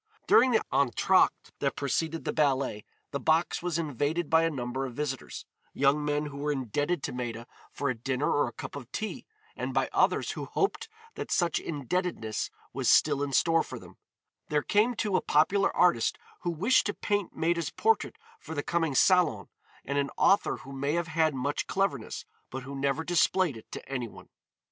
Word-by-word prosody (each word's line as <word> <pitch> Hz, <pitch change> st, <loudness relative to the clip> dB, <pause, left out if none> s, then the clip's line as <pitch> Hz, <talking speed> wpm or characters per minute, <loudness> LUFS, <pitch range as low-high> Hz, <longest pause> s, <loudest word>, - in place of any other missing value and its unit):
During 255 Hz, +3 st, +6 dB
the 230 Hz, -, +2 dB
entr'acte 135 Hz, -5 st, +2 dB
that -, -, 0 dB
preceded 160 Hz, +3 st, -2 dB
the -, -, -1 dB
ballet 135 Hz, -8 st, +1 dB, 0.3 s
the 140 Hz, -, -2 dB
box 160 Hz, +5 st, +1 dB
was 175 Hz, -2 st, -1 dB
invaded 155 Hz, +1 st, -1 dB
by 160 Hz, 0 st, +6 dB
a 165 Hz, -, +2 dB
number 130 Hz, -2 st, -3 dB
of 125 Hz, -, -10 dB
visitors, 140 Hz, -3 st, -4 dB, 0.3 s
young 140 Hz, +2 st, +3 dB
men 150 Hz, 0 st, 0 dB
who 145 Hz, -1 st, -7 dB
were 145 Hz, +1 st, -1 dB
indebted 145 Hz, +5 st, -1 dB
to -, -, -2 dB
Maida 120 Hz, -2 st, -4 dB, 0.3 s
for 140 Hz, -, -3 dB
a 130 Hz, -, +1 dB
dinner 130 Hz, +4 st, -1 dB
or 145 Hz, -, +2 dB
a -, -, -5 dB
cup -, -, -8 dB
of 135 Hz, -3 st, -9 dB
tea 215 Hz, -1 st, -5 dB, 0.3 s
and -, -, -4 dB
by -, -, +2 dB
others -, -, +2 dB
who -, -, -5 dB
hoped 400 Hz, +2 st, -1 dB, 0.2 s
that -, -, -6 dB
such 175 Hz, -2 st, +1 dB
indebtedness 145 Hz, -, -2 dB, 0.2 s
was -, -, 0 dB
still 140 Hz, -, +4 dB
in 145 Hz, -1 st, -1 dB
store 165 Hz, +4 st, +3 dB
for -, -, -7 dB
them; -, -, -14 dB, 0.5 s
there 150 Hz, -1 st, 0 dB
came, 220 Hz, +4 st, +2 dB
too, 210 Hz, -3 st, -1 dB
a -, -, +3 dB
popular 195 Hz, +7 st, +3 dB
artist 175 Hz, -11 st, +3 dB, 0.2 s
who 175 Hz, -, -3 dB
wished 200 Hz, +12 st, +3 dB
to 205 Hz, -, -3 dB
paint 205 Hz, -3 st, -1 dB
Maida's 170 Hz, -1 st, 0 dB
portrait 450 Hz, 0 st, +1 dB, 0.2 s
for 160 Hz, -, -8 dB
the 145 Hz, -, -2 dB
coming 165 Hz, -5 st, 0 dB
Salon 180 Hz, +2 st, +3 dB, 0.4 s
and 140 Hz, +1 st, 0 dB
an 140 Hz, 0 st, 0 dB
author 200 Hz, +1 st, +3 dB
who 135 Hz, -, -12 dB
may 140 Hz, +2 st, -1 dB
have 170 Hz, -1 st, -1 dB
had 160 Hz, -2 st, +2 dB
much 140 Hz, +3 st, -2 dB
cleverness, 190 Hz, -, -2 dB, 0.2 s
but 130 Hz, 0 st, -6 dB
who 135 Hz, +2 st, -8 dB
never 140 Hz, +3 st, 0 dB
displayed 175 Hz, -2 st, +2 dB
it 110 Hz, -, -13 dB
to -, -, -8 dB
any 125 Hz, -3 st, -3 dB
one. -, -, -14 dB
150 Hz, 190 wpm, -29 LUFS, 135-175 Hz, 0.5 s, During